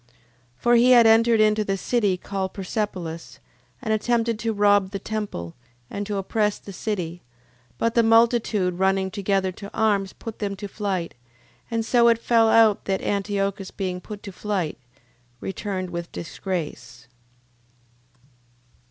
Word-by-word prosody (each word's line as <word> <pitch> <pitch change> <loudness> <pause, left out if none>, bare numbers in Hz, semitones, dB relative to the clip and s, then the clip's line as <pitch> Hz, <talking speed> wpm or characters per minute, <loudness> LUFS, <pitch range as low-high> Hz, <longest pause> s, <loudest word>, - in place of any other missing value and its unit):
9:2. 120 - -36 0.5
For 240 - +2
he 245 +2 +5
had 240 -2 +7
entered 225 0 +5
into 215 0 +3
the 195 -1 -1
city 205 -3 +1
called 190 0 -4
Persepolis, 180 - -4 0.5
and 220 - 0
attempted 230 0 0
to 230 -1 -1
rob 205 -2 +3
the 200 - -4
temple, 200 - -5 0.4
and 205 0 -4
to 205 -1 -2
oppress 210 +2 0
the 200 - -11
city, 180 -4 -4 0.6
but 230 0 0
the 235 - +4
multitude 225 -5 +3
running 190 0 +1
together 195 -1 0
to 200 +2 -9
arms, 200 -3 +1
put 225 -1 -9
them 200 -1 -2
to 200 +1 -6
flight: 195 -4 -3 0.6
and 230 -1 -1
so 235 0 +4
it 230 -1 +5
fell 230 -1 +3
out 220 -2 +4
that 195 -1 -1
Antiochus 200 -1 -1
being 180 -2 -4
put 210 0 -9
to 200 - -7
flight, 190 -7 -3 0.6
returned 190 - -4
with 170 0 -5
disgrace. 160 - -6
200 Hz, 145 wpm, -24 LUFS, 190-220 Hz, 0.6 s, had